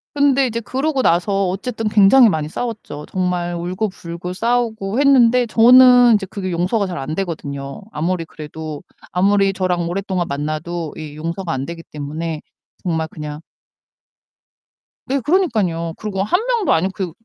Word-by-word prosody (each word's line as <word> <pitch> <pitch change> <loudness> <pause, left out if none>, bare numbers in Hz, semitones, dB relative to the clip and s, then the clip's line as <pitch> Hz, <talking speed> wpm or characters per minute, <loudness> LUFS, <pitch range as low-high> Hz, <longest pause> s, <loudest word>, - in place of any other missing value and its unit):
근데 275 -2 +3
이제 230 -1 -2
그러고 270 +4 -1
나서 195 +2 +2
어쨌든 220 +4 -3
굉장히 215 +4 +6
많이 155 -5 -1
싸웠죠. 215 -10 -5
정말 180 -2 -1
울고불고 180 -1 -4
싸우고 230 0 -1
했는데 250 -3 +5
저는 245 +1 +7
이제 200 -2 -1
그게 185 -2 -5
용서가 185 +5 0
잘 175 - -5
안 150 +4 -4
되거든요. 140 -5 -5
아무리 165 +2 -2
그래도 155 -1 -8 0.3
아무리 195 +1 +2
저랑 180 -2 -1
오랫동안 185 -1 -2
만나도 155 +3 -4
이 150 -2 -8
용서가 170 +3 -4
안 135 +1 -3
되기 170 0 -7
때문에 155 +2 -5 0.4
정말 160 -3 -1
그냥 150 0 -7 1.7
네, 275 +1 0
그러니깐요. 215 - 0
그리고 195 -3 -3
1 355 - +1
명도 470 -5 +1
아니고 185 +4 +1
그 185 -6 -4
185 Hz, 325 characters per minute, -19 LUFS, 165-225 Hz, 1.7 s, 저는